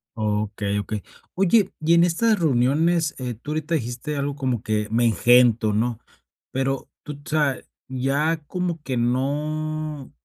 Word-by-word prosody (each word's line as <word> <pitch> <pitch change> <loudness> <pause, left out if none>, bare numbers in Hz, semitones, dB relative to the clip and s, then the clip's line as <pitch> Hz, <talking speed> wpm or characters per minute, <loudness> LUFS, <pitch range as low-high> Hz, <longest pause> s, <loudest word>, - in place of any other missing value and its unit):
Okey, 105 -1 -1
okey. 105 0 -4 0.3
Oye, 195 +3 +3
y 160 +2 +2
en 170 0 +6
estas 210 +5 +2
reuniones, 155 +3 +2
eh, 125 -2 -4
tú 120 +7 -8
ahorita 155 +2 -1
dijiste 130 +2 -3
algo 140 0 -2
como 130 -6 -2
que: 105 -1 -1
"Me 115 +2 +2
engento", 120 +1 +4
¿no?, 115 +2 0 0.5
pero 135 +1 -2
tú, 150 - -6
o 145 0 -12
sea, 150 -4 +1 0.3
ya 135 +5 0
como 180 -3 -3
que 130 -4 -2
no 150 +4 -2
135 Hz, 145 wpm, -23 LUFS, 120-155 Hz, 0.5 s, en